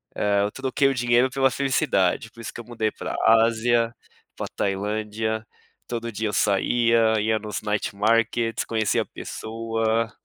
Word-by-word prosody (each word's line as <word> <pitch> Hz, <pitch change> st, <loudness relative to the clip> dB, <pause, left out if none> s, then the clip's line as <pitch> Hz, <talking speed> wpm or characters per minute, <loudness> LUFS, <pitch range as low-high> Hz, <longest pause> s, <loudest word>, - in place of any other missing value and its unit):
eh, 100 Hz, -1 st, +2 dB
eu 105 Hz, -, -1 dB
troquei 135 Hz, +2 st, +1 dB
o -, -, 0 dB
dinheiro 120 Hz, 0 st, +3 dB
pela 135 Hz, 0 st, +2 dB
felicidade 130 Hz, -, +1 dB
por 115 Hz, -, -13 dB
isso -, -, -7 dB
que -, -, -8 dB
eu 120 Hz, -, -8 dB
mudei 110 Hz, -2 st, -2 dB
para -, -, -5 dB
Ásia, 115 Hz, +1 st, +3 dB, 0.4 s
pra -, -, -4 dB
Tailândia, 110 Hz, +2 st, -2 dB, 0.4 s
todo 115 Hz, -1 st, -4 dB
dia 110 Hz, 0 st, -2 dB
eu 105 Hz, -, -3 dB
saía, 110 Hz, +3 st, +3 dB
ia 110 Hz, +1 st, +1 dB
nos 105 Hz, -2 st, -5 dB
Night 105 Hz, -1 st, -2 dB
Markets, 115 Hz, +2 st, +1 dB
conhecia 110 Hz, -2 st, 0 dB
pessoa. 115 Hz, 0 st, -2 dB
115 Hz, 150 wpm, -24 LUFS, 110-120 Hz, 0.4 s, dinheiro